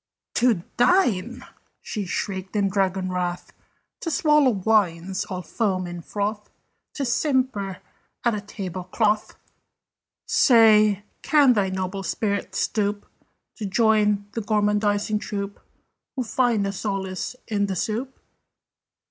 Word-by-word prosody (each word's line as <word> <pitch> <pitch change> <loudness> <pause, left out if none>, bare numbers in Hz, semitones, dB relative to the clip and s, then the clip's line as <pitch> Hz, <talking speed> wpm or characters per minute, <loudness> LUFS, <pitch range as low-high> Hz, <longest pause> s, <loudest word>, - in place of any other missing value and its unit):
"To 230 -8 +2
dine!" 245 - +2 0.3
she 210 -3 -4
shrieked 190 +1 -4
in 200 -1 +2
dragon 190 -1 0
wrath. 180 -1 -3 0.5
"To 330 - -3
swallow 300 -2 +4
wines 190 -4 +1
all 185 -1 -5
foam 190 -5 -1
and 175 -1 -7
froth! 205 +2 -3 0.5
To 280 - -2
simper 250 -7 0 0.5
at 235 - +3
a 210 - -3
table 185 -3 -6
cloth! 210 +2 0 0.9
"Say, 220 - +5 0.2
can 290 -5 +5
thy 200 -4 +1
noble 190 +1 -3
spirit 200 +1 -2
stoop 205 -1 -1 0.5
To 210 - -4
join 210 -1 +2
the 225 - -3
gormandising 210 0 +1
troop 200 -2 -5 0.6
Who 260 - -1
find 235 -3 +1
a 195 - -1
solace 195 +1 -3
in 205 -2 0
the 190 - -2
soup? 230 +8 -3
205 Hz, 120 wpm, -24 LUFS, 190-230 Hz, 0.9 s, Say